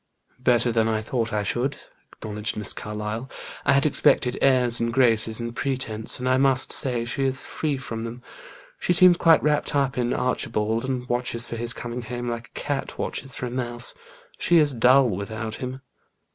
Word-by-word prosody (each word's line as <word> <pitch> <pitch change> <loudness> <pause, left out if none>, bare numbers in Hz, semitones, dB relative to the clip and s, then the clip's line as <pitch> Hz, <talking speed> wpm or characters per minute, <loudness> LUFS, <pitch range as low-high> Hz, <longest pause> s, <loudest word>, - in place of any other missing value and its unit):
"Better 125 -1 +3
than 115 -1 +2
I 110 -1 0
thought 115 +1 -2
I 105 -1 0
should," 125 +7 -1 0.3
acknowledged 105 0 -4
Miss 105 - 0
Carlyle. 105 +4 -5 0.4
"I 140 - +4
had 140 +1 +3
expected 130 -3 +3
airs 125 -3 +3
and 115 0 0
graces 115 -3 +2
and 115 0 -5
pretence, 120 -6 -2
and 125 - -3
I 130 0 +3
must 130 -1 +4
say 125 -4 +1
she 135 +3 -2
is 135 0 +1
free 150 -3 -2
from 115 -3 -6
them. 115 +2 -7 0.6
She 180 - +1
seems 180 0 +6
quite 165 -2 +5
wrapped 150 0 0
up 135 -3 +1
in 120 0 0
Archibald 115 -2 -1
and 130 -2 -3
watches 120 -1 -1
for 120 - -6
his 115 +1 -1
coming 120 +1 -5
home 120 +1 -5
like 120 0 -4
a - - -9
cat 145 -2 -3
watches 135 -1 -4
for - - -4
a 120 - -5
mouse. 120 -1 -2 0.5
She 175 - +3
is 150 -3 +4
dull 125 +3 +5
without 110 +2 -4
him." 130 +1 -6
120 Hz, 185 wpm, -24 LUFS, 115-130 Hz, 0.6 s, seems